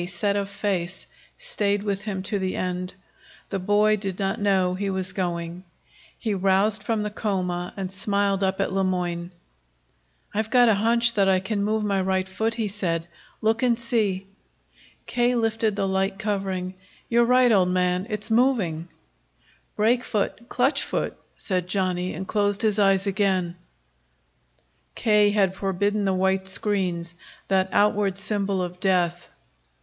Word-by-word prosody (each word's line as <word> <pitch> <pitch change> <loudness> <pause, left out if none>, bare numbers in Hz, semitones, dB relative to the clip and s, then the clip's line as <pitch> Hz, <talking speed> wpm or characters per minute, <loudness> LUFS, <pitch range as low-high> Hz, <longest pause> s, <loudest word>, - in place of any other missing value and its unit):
set 195 +3 0
of 200 -1 -1
face, 190 -3 -3 0.3
stayed 205 - 0
with 200 -1 -2
him 195 -3 -4
to 200 +1 -2
the 190 -1 -2
end. 180 0 -3 0.6
The 195 - -2
boy 210 +3 +3
did 195 -3 -4
not 195 -1 -1
know 190 -3 +2
he 200 +2 -2
was 190 -1 -2
going. 175 -1 -3 0.5
He 220 -3 -2
roused 195 +2 +2
from 215 0 -1
the 210 - -3
coma 180 -4 -2
and 190 -1 -4
smiled 200 0 0
up 190 0 0
at 195 - 0
Le 195 0 +1
Moyne. 175 -2 -2 1.0
"I've 220 +1 -1
got 245 0 +5
a - - +5
hunch 235 +3 +3
that 195 -3 +3
I 190 -1 +4
can 200 +2 -2
move 215 +1 0
my 200 -2 +1
right 190 0 0
foot," 220 +4 -1
he 225 -2 -1
said. 175 -5 -2 0.4
"Look 220 +1 +2
and 245 -2 +3
see." 215 -5 0 0.8
K. 245 0 +1
lifted 225 -2 0
the 200 -1 0
light 190 +1 0
covering. 195 -3 -2 0.3
"You're 235 0 +4
right, 250 0 +5
old 185 -4 +4
man. 180 +1 +1
It's 210 +1 -2
moving." 220 -10 +2 0.9
"Brake 235 +4 +2
foot, 225 +2 -2
clutch 255 +4 +2
foot," - - -2 0.2
said 180 -3 -1
Johnny, 185 -1 -1
and 190 - -5
closed 205 -1 +1
his 215 -1 +2
eyes 195 -1 +3
again. 190 -3 0 1.4
K. 210 -2 +4
had 195 -2 +2
forbidden 200 +2 0
the 190 - +2
white 190 0 +1
screens, 185 -4 -1 0.4
that 190 -1 +2
outward 205 -2 +2
symbol 200 -2 -1
of 180 0 -6
death. 175 -2 +1
195 Hz, 155 wpm, -24 LUFS, 185-210 Hz, 1.4 s, got